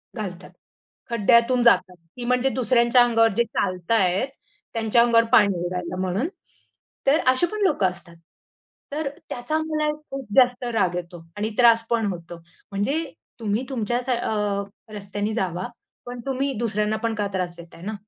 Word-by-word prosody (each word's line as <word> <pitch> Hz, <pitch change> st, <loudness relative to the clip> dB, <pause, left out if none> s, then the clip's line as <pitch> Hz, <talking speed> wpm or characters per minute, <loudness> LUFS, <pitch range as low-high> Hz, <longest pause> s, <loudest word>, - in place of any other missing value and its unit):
घालतात. 185 Hz, -5 st, -6 dB, 0.6 s
खड्ड्यातून 235 Hz, +2 st, +4 dB
जातात. 190 Hz, -6 st, +4 dB, 0.2 s
की 245 Hz, -, -5 dB
म्हणजे 250 Hz, +2 st, +2 dB
दुसऱ्यांच्या 245 Hz, 0 st, +4 dB
अंगावर 230 Hz, -2 st, +3 dB
जे 235 Hz, -, +5 dB
चालतायत, 185 Hz, +3 st, +1 dB, 0.5 s
त्यांच्या 225 Hz, +1 st, +3 dB
अंगावर 230 Hz, -1 st, +4 dB
पाणी 200 Hz, -3 st, +5 dB
उडायला 180 Hz, 0 st, -4 dB
म्हणून. 190 Hz, -, -1 dB, 0.8 s
तर 295 Hz, +4 st, +5 dB
अशी 255 Hz, +6 st, +4 dB
पण 430 Hz, -, -4 dB
लोकं 295 Hz, -, +3 dB
असतात. 175 Hz, -2 st, -11 dB, 0.8 s
तर 295 Hz, -2 st, -2 dB, 0.2 s
त्याचा 245 Hz, +6 st, -2 dB
मला 310 Hz, -1 st, 0 dB, 0.2 s
खूप 270 Hz, -1 st, -5 dB
जास्त 250 Hz, -1 st, +4 dB
राग 185 Hz, -5 st, +1 dB
येतो 175 Hz, -1 st, -6 dB
आणि 215 Hz, +2 st, -1 dB
त्रास 230 Hz, -2 st, +5 dB
पण 235 Hz, -2 st, +1 dB
होतो. 170 Hz, 0 st, -9 dB, 0.3 s
म्हणजे 270 Hz, +12 st, 0 dB, 0.4 s
तुम्ही 220 Hz, +2 st, -1 dB
तुमच्या 240 Hz, -1 st, -1 dB
स 260 Hz, -, -7 dB
अ, 210 Hz, -4 st, 0 dB, 0.3 s
रस्त्यानी 205 Hz, +1 st, -3 dB
जावा 185 Hz, -2 st, -2 dB, 0.4 s
पण 245 Hz, 0 st, -7 dB
तुम्ही 270 Hz, +1 st, -1 dB
दुसऱ्यांना 215 Hz, -1 st, 0 dB
पण 230 Hz, -1 st, 0 dB
का 205 Hz, -1 st, -1 dB
त्रास 180 Hz, -2 st, -2 dB
देताय 170 Hz, 0 st, -13 dB
ना? 215 Hz, +4 st, -4 dB
225 Hz, 150 wpm, -23 LUFS, 195-250 Hz, 0.8 s, जे